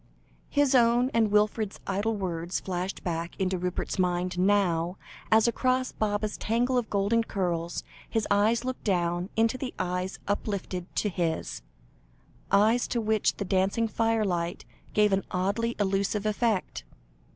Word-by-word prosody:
His 285 -2 +2
own, 245 +1 +4
and 225 -2 +3
Wilfred's 210 0 +1
idle 205 +3 0
words, 175 -3 -2
flashed 185 0 -4
back 170 -1 -3
into 185 -1 0
Rupert's 180 +1 -3
mind 180 0 0
now, 180 -3 +2 0.3
as, 220 +1 +5
across 255 +2 +1
Baba's 210 0 -1
tangle 240 +3 0
of 245 -3 0
golden 205 +3 +2
curls, 175 -5 -2 0.3
his 225 -2 0
eyes 220 +4 +3
looked 255 0 -4
down 175 -2 0
into 225 +3 +2
the 260 -2 -5
eyes 180 +1 -2
uplifted 200 -3 -2
to 210 - +1
his 170 -3 -2 0.9
eyes 220 +5 +4
to 240 - -1
which 220 -1 +1
the 200 - -3
dancing 195 +5 +1
firelight 210 -7 0 0.3
gave 210 -1 +4
an 195 - +2
oddly 200 +6 -1
elusive 200 +1 0
effect. 215 -2 0
205 Hz, 140 wpm, -28 LUFS, 180-225 Hz, 0.9 s, as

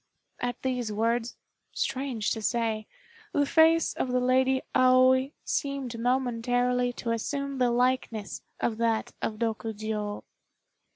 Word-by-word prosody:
At 245 0 -3
these 250 -4 -1
words, 230 +2 -1 0.4
strange 260 -5 -2
to 220 - -2
say, 220 -1 -1 0.5
the 285 - +3
face 325 +2 +4
of - - -2
the 250 - +2
Lady 260 +1 +2
Aoi 255 +1 +5
seemed 275 -5 -2
momentarily 245 0 +1
to 235 -1 -3
assume 275 +4 -2
the 250 -1 +3
likeness 240 -3 0 0.2
of 225 -2 -1
that 230 -1 0
of - - -1
Rokjiô. 215 -2 -3
245 Hz, 120 wpm, -28 LUFS, 225-260 Hz, 0.5 s, Aoi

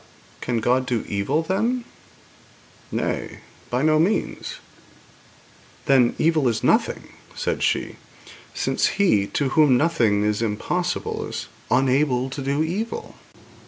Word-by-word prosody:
'But - - -27
can 120 -2 0
God 125 +3 +1
do 120 -3 -1
evil, 115 +11 0
then?' 230 +8 0 1.1
'Nay; - - -3 0.3
by 125 +3 0
no 155 0 +4
means.' 185 +7 -1 1.3
'Then, 130 -3 +4
evil 155 -4 +2
is 115 -2 -1
nothing,' - - +1 0.3
said - - -2
she, - - 0 0.5
'since - - 0
He 105 - +3
to 140 +4 -1
whom 140 -3 +5
nothing 120 -10 +2
is 105 +1 0
impossible 175 +12 -2
is - - -6 0.2
unable 130 0 +2
to 140 - -5
do 140 +3 0
evil.' 220 - -4
135 Hz, 125 wpm, -23 LUFS, 120-165 Hz, 1.3 s, whom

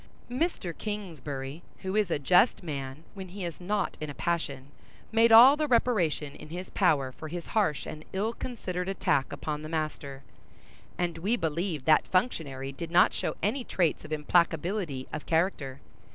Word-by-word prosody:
Mr. 250 - -1
Kingsbury, 155 -8 -5 0.2
who 190 +1 -2
is 210 -4 +2
a - - +1
just 180 - +4
man 140 -2 -5
when 190 -2 -7
he 185 +1 -6
is 170 +1 -6
not 205 +4 -1
in 155 - -3
a 145 - -7
passion, 145 -5 -2 0.4
made 230 +1 +5
all 245 +5 +10
the 305 0 0
reparation 185 - +1
in - - -11
his 180 +3 -6
power 145 -9 +2
for 145 +5 -9
his 170 +2 -5
harsh 195 -10 +1
and 155 - -7
ill 210 +4 -1
considered 190 -8 -4
attack 160 -7 +1
upon 150 -1 -4
the 155 - -7
master; 150 -4 -4 0.7
and 170 -2 -1
we 205 +8 +1
believe 165 - -2
that 155 -1 +5
functionary 145 - -1
did 165 +4 -6
not 175 +1 +5
show - - -2
any 245 +6 0
traits 175 -9 0
of - - -10
implacability 165 -1 +1
of 155 - -5
character. 160 -6 0
170 Hz, 165 wpm, -29 LUFS, 150-200 Hz, 0.7 s, all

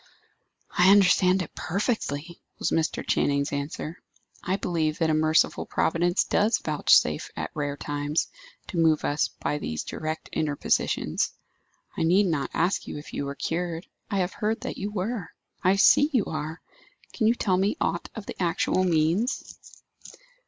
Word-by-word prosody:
"I 180 +1 +6
understand 190 -1 +5
it 160 - -11
perfectly," 170 - -2 0.2
was - - -1
Mr. 165 0 0
Channing's 140 +1 +1
answer. 145 +3 -4 0.4
"I 185 - 0
believe 160 -5 -1
that 160 -2 +1
a - - +2
merciful 155 +1 +2
Providence 175 +2 +1
does 215 +2 +2
vouchsafe, 145 - +3
at 80 0 -4
rare 145 -1 -3
times, 145 +2 -1 0.4
to 175 - -2
move 160 -2 +3
us 145 +1 +1
by 150 - -3
these 80 - -3
direct 155 0 -5
interpositions. 150 -2 0 0.6
I - - -3
need 185 +5 +4
not 155 -7 -1
ask 175 +4 0
you - - -5
if 150 - -10
you 140 - -2
were 140 0 -5
cured. 170 +2 -3 0.2
I 200 - -1
have 180 -1 0
heard 220 +1 -1
that - - -5
you 200 - -2
were. 205 -1 -3 0.3
I 185 +2 +4
see 285 +8 +6
you 245 -8 +2
are. 160 +1 -4 0.5
Can 220 - +1
you 230 - +4
tell 190 -6 +1
me 195 +2 +1
aught 170 +1 -1
of 220 -3 -7
the - - -7
actual 180 +1 +1
means?" 175 - 0
165 Hz, 160 wpm, -26 LUFS, 155-195 Hz, 0.6 s, I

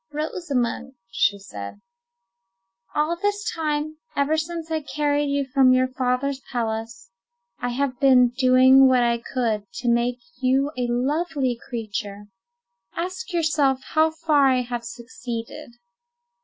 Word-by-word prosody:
"Rosamond," 280 -5 -2 0.2
she 200 +1 +2
said, 105 - -9 1.2
"all 305 +3 +1
this 410 +3 -2
time, 310 -1 -2 0.2
ever 285 +2 +2
since 325 +1 -4
I 315 -1 0
carried 290 0 0
you 280 0 0
from 265 -1 +4
your 255 0 +2
father's 260 +1 -1
palace, 230 0 -4 0.5
I 245 - -2
have 255 0 -2
been 255 -3 +5
doing 260 +1 +6
what 255 -1 +4
I 235 0 +1
could 220 -5 -2
to 245 - -5
make 240 +1 +2 0.2
you 265 +2 +2
a 250 -1 -1
lovely 270 +1 0
creature: 210 -4 -5 0.7
ask 370 +7 -4
yourself 310 -6 +1
how 315 0 +3
far 315 -3 +2
I 255 -1 +3
have 240 -1 -5
succeeded." 235 0 -7
260 Hz, 130 wpm, -23 LUFS, 240-300 Hz, 1.2 s, doing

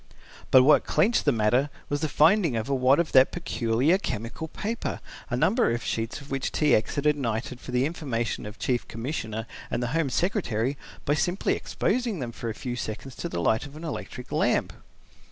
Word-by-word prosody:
But 130 - +7
what 150 +3 +6
clinched 220 +4 +2
the 145 - +5
matter 120 +4 +2 0.2
was 145 0 -2
the 155 - 0
finding 165 - +4
of 110 -1 -2
a 140 - 0
wad 130 +2 +4
of 170 -3 0
that 130 0 +6
peculiar 140 0 +1
chemical 115 - -4
paper, 220 +8 -4 0.3
a - - -1
number 240 +1 +3
of 115 0 -1
sheets 115 +3 -2
of 140 -1 -13
which 135 -1 -1
T. 150 -4 +2
X. 110 - +2
had 145 - -2
ignited 130 -3 0
for - - -11
the 125 +1 +2
information 130 -9 -3
of 105 - -9
the - - -8
Chief 125 -2 0
Commissioner 115 -2 -4 0.2
and 120 - -1
the 120 - -1
Home 165 -3 +1
Secretary 130 - 0 0.3
by 145 - +2
simply 175 +5 +1
exposing 235 -2 -1
them 125 -5 -4
for 115 0 -5
a 110 - -4
few 120 0 -4
seconds 120 +3 -6
to - - -4
the 85 - -3
light 110 +10 +1
of 140 - -14
an 155 - -9
electric 140 -5 -6
lamp. - - +1
135 Hz, 205 wpm, -26 LUFS, 115-155 Hz, 0.3 s, But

